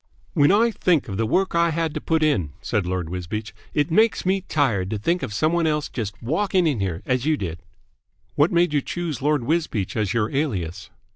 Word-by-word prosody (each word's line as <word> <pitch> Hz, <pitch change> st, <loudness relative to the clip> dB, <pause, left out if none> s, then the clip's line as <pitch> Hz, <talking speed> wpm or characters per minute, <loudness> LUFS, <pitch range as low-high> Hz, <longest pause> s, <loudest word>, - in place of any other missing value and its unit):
"When 145 Hz, +3 st, +4 dB
I 230 Hz, +4 st, +4 dB
think 180 Hz, -7 st, +1 dB
of 95 Hz, -3 st, -4 dB
the 115 Hz, 0 st, 0 dB
work 190 Hz, -, +1 dB
I 170 Hz, 0 st, +3 dB
had 165 Hz, -1 st, -1 dB
to -, -, -4 dB
put 160 Hz, -1 st, +1 dB
in," 95 Hz, -, +1 dB
said 100 Hz, -5 st, -1 dB
Lord 90 Hz, -2 st, -2 dB
Wisbeach, 90 Hz, +5 st, -5 dB, 0.2 s
"it 150 Hz, +3 st, +1 dB
makes 220 Hz, +4 st, +3 dB
me 190 Hz, +1 st, +2 dB
tired 125 Hz, -, 0 dB
to 110 Hz, -, -2 dB
think 170 Hz, -, 0 dB
of -, -, -4 dB
some 155 Hz, +10 st, +1 dB
one 170 Hz, -1 st, +2 dB
else 150 Hz, -1 st, 0 dB
just 105 Hz, -4 st, -5 dB
walking 180 Hz, -, +1 dB
in 145 Hz, -8 st, +1 dB
here 95 Hz, -4 st, -2 dB
as 125 Hz, +2 st, 0 dB
you 155 Hz, -1 st, +3 dB
did." 85 Hz, -, -5 dB, 0.7 s
"What 145 Hz, +4 st, +3 dB
made 170 Hz, -2 st, +2 dB
you 145 Hz, -, +2 dB
choose 165 Hz, -4 st, -4 dB
Lord 145 Hz, -2 st, +1 dB
Wisbeach 150 Hz, -, -1 dB
as 105 Hz, -4 st, 0 dB
your 110 Hz, -2 st, 0 dB
alias?" 95 Hz, -, -2 dB
145 Hz, 215 wpm, -23 LUFS, 105-170 Hz, 0.7 s, When